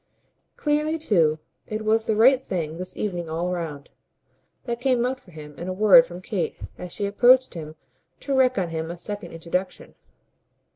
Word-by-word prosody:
Clearly 300 +1 0
too 170 - +2 0.3
it 215 0 -4
was 220 +1 +2
the 220 - +1
right 255 +4 +5
thing 165 -5 -4
this 185 0 -7
evening 175 -5 -3
all 170 +3 -2
round: 160 -5 -5 0.7
that 235 -2 -4
came 250 -2 +2
out 260 +1 -2
for 195 - -21
him 150 -3 -11
in 175 - -5
a 185 - -2
word 215 +6 +7
from 175 +1 -10
Kate 200 -6 -3 0.2
as 180 -1 -8
she 205 - -2
approached 250 +6 +4
him 155 -3 -8 0.5
to 275 - -1
wreak 255 -2 +3
on 180 -3 0
him 160 0 -4
a 170 - -6
second 205 +4 -6
introduction. 175 +3 -4
195 Hz, 180 wpm, -24 LUFS, 170-245 Hz, 0.7 s, word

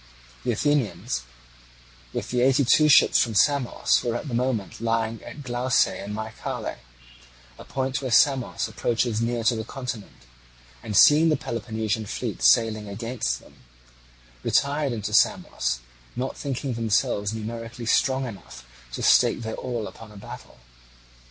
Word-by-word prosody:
The - - 0
Athenians 115 - -1 0.9
with - - -5
the 125 0 +1
eighty 135 +2 +4
two 150 +5 +5
ships 140 - +6
from 115 -3 +1
Samos 140 +2 +2
were 120 -1 -1
at 120 - -4
the 130 - -6
moment 120 -4 -2
lying 115 -1 -1
at 145 - -10
Glauce 125 0 +2
in 100 +2 -6
Mycale, 110 +1 -5 0.8
a - - -9
point 135 0 -2
where 130 - -3
Samos 130 0 +3
approaches 110 +1 -1
near 115 0 -1
to 115 +1 +3
the 110 - -3
continent; 120 - -7 0.6
and, 105 -3 -2
seeing 155 +8 +7
the 155 - +2
Peloponnesian 110 -2 -3
fleet - - -4
sailing 110 - +3
against 110 - -3
them, - - -19 0.8
retired 140 - +1
into 110 -4 -4
Samos, - - +1 0.3
not 130 +2 -3
thinking 135 -1 -3
themselves 105 -2 0
numerically 115 +2 -6
strong 130 +3 +2
enough 95 - -10 0.3
to - - -4
stake - - +4
their 110 0 -4
all 120 -4 -4
upon 110 0 -11
a 105 - -13
battle. - - -11
115 Hz, 145 wpm, -25 LUFS, 110-130 Hz, 0.9 s, seeing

